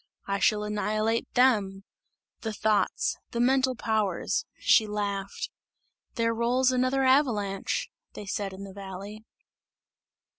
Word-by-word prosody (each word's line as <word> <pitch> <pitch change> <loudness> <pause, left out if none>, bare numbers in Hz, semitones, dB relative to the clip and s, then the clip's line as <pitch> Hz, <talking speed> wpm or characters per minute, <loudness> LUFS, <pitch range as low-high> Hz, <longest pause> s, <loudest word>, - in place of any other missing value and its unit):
I 200 0 -1
shall 210 0 +2
annihilate 215 +2 -1
them! 205 -7 +3 0.6
The 220 -1 -4
thoughts! 210 0 +1
The 235 - -2
mental 260 +1 +3
powers!" 220 - 0
She 220 - +4
laughed. 200 -2 -3 0.6
"There 230 0 +1
rolls 245 +3 +2
another 255 +1 +1
avalanche!" 235 -8 +1 0.3
they 210 - -8
said 200 0 -3
in 190 +1 -9
the 195 -1 -9
valley. 200 +2 -8
215 Hz, 115 wpm, -27 LUFS, 200-245 Hz, 0.6 s, She